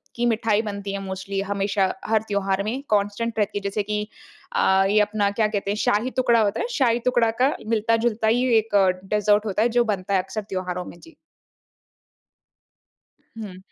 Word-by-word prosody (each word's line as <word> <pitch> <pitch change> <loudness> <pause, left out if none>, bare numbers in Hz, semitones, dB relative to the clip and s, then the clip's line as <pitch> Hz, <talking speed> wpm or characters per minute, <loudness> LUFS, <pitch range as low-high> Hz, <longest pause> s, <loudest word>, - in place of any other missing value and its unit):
की 240 - -1
मिठाई 220 -2 +2
बनती 200 -2 -5
है 200 - -3
मोस्टली 190 +1 -4
हमेशा 200 -1 0
हर 220 -1 +2
त्योहार 200 -1 0
में 235 +6 -3
कांस्टेंट 210 +3 0
रहती 205 0 0
है। - - -14
जैसे 200 +1 -2
कि 210 +1 -3 0.5
अ, 190 0 +3
ये 210 +1 +4
अपना 210 -1 +1
क्या 220 - +3
कहते 205 -2 -2
हैं - - -1
शाही-टुकड़ा 235 +3 +2
होता 205 -2 0
है। - - -1
शाही-टुकड़ा 240 - +2
का 270 +3 +3
मिलता-जुलता 225 0 +1
ही 245 +3 +2
एक 220 -1 -1 0.3
डेज़र्ट 210 +1 +2
होता 210 0 -1
है 240 - +2
जो 240 +1 +3
बनता 190 +1 -4
है 185 - +3
अक्सर 215 +3 -5
त्योहारों 180 -1 -3
में। 170 - -11
जी। 330 - -17 2.2
हुँ। 205 -4 -7
210 Hz, 170 wpm, -23 LUFS, 200-230 Hz, 2.2 s, ये